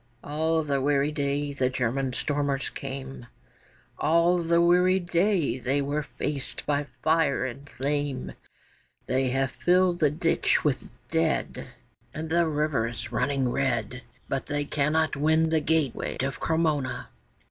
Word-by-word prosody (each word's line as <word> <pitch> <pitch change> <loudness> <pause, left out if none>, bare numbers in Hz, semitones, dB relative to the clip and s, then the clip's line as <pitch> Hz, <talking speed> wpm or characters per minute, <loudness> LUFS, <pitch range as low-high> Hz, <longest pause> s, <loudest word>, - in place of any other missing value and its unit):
All 160 +2 0
the 140 -2 0
weary 145 +1 +2
day 145 -1 -1
the 130 -2 +1
German 130 +1 -1
stormers 140 0 -1
came, 135 -2 -7 0.7
All 170 +3 +3
the 170 0 +2
weary 180 +2 +4
day 175 - +1
they 135 +3 0
were 145 +2 -1
faced 145 -1 -4
by 145 0 0 0.2
fire 160 -4 +2
and 135 +3 -7
flame, 145 -1 -2 0.7
They 130 0 +1
have 135 +1 0
filled 180 +2 +2
the 150 - +4
ditch 165 +3 +1
with 145 -4 -1 0.2
dead, 160 -1 0 0.5
And 160 +1 -5
the 170 0 +3
river's 145 -7 -1
running 135 -3 0
red; 125 -2 -1 0.3
But 135 - -3
they 145 0 -1
cannot 155 +2 +1
win 160 +3 +3
the 160 -1 +2
gateway 155 -4 0
of 135 +1 -3
Cremona. 155 -5 0
145 Hz, 135 wpm, -27 LUFS, 135-160 Hz, 0.7 s, weary